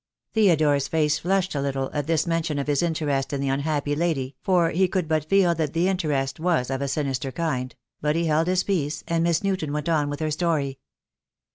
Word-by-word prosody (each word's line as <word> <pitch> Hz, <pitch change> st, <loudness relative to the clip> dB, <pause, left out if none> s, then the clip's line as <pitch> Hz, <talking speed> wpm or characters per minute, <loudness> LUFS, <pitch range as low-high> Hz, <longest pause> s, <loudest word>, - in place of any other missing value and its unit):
Theodore's 155 Hz, -, +3 dB
face 150 Hz, -2 st, +1 dB
flushed 190 Hz, +1 st, 0 dB
a 140 Hz, -, -1 dB
little 135 Hz, -1 st, -2 dB
at 145 Hz, -1 st, -2 dB
this 165 Hz, -2 st, +1 dB
mention 165 Hz, -3 st, -1 dB
of 140 Hz, -, -1 dB
his 145 Hz, -2 st, +1 dB
interest 150 Hz, -5 st, -1 dB
in 140 Hz, -, -1 dB
the 135 Hz, 0 st, -1 dB
unhappy 145 Hz, +1 st, -1 dB
lady, 145 Hz, -5 st, -1 dB
for 175 Hz, -3 st, +2 dB
he 185 Hz, +3 st, +2 dB
could 180 Hz, -2 st, -1 dB
but 155 Hz, -1 st, -1 dB
feel 190 Hz, -3 st, +4 dB
that 155 Hz, -3 st, -2 dB
the 170 Hz, +2 st, +2 dB
interest 150 Hz, -8 st, -1 dB
was 160 Hz, -7 st, +1 dB
of 135 Hz, 0 st, -2 dB
a 140 Hz, -, -1 dB
sinister 135 Hz, -2 st, -2 dB
kind; 130 Hz, -4 st, -2 dB, 0.3 s
but 150 Hz, +1 st, +1 dB
he 170 Hz, 0 st, +1 dB
held 160 Hz, +1 st, +2 dB
his 185 Hz, 0 st, +2 dB
peace, 160 Hz, -7 st, -1 dB
and 165 Hz, 0 st, +1 dB
Miss 170 Hz, +1 st, +1 dB
Newton 190 Hz, -7 st, -1 dB
went 150 Hz, +2 st, -2 dB
on 150 Hz, -3 st, +1 dB
with 145 Hz, -, -4 dB
her 155 Hz, -1 st, -1 dB
story. 150 Hz, -4 st, -1 dB
155 Hz, 215 wpm, -24 LUFS, 140-170 Hz, 0.3 s, feel